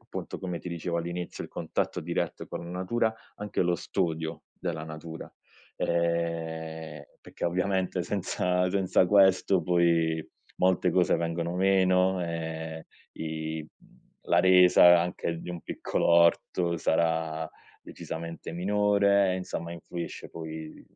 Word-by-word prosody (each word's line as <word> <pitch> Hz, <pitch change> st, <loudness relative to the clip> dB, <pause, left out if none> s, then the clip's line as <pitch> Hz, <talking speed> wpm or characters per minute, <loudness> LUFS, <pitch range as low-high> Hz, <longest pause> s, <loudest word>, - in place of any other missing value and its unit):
appunto, -, -, -7 dB
come 90 Hz, -2 st, -4 dB
ti -, -, -7 dB
dicevo 85 Hz, 0 st, -3 dB
all'inizio, 85 Hz, +1 st, -4 dB
il -, -, -11 dB
contatto -, -, -2 dB
diretto -, -, -3 dB
con -, -, -6 dB
la 85 Hz, -, -8 dB
natura- 110 Hz, +6 st, 0 dB, 0.2 s
anche 105 Hz, -2 st, -1 dB
lo 90 Hz, 0 st, +2 dB
studio 80 Hz, -1 st, -2 dB
della 80 Hz, -, -4 dB
natura, 80 Hz, +1 st, -8 dB, 0.4 s
ehm, 80 Hz, -2 st, -2 dB, 0.2 s
perché, -, -, -8 dB
ovviamente, 90 Hz, +1 st, 0 dB
senza 90 Hz, -1 st, 0 dB
senza 95 Hz, -1 st, +3 dB
questo 95 Hz, -1 st, +4 dB
poi 85 Hz, -2 st, +2 dB, 0.3 s
molte 90 Hz, 0 st, +3 dB
cose 90 Hz, 0 st, +3 dB
vengono 85 Hz, +1 st, -2 dB
meno, 95 Hz, -1 st, +3 dB
ehm, 80 Hz, -1 st, -5 dB, 0.3 s
i 80 Hz, 0 st, -4 dB, 0.6 s
la -, -, +4 dB
resa 90 Hz, -1 st, +7 dB
anche 85 Hz, -1 st, -2 dB
di -, -, -7 dB
un 85 Hz, -2 st, -6 dB
piccolo -, -, -2 dB
orto 85 Hz, +1 st, +3 dB
sarà 80 Hz, -1 st, 0 dB, 0.4 s
decisamente 85 Hz, 0 st, -7 dB
minore 100 Hz, +1 st, +3 dB
e, 90 Hz, -, -1 dB
insomma, 85 Hz, -2 st, -5 dB
influisce 85 Hz, 0 st, -7 dB
poi 80 Hz, -1 st, -8 dB
85 Hz, 125 wpm, -28 LUFS, 80-90 Hz, 0.6 s, resa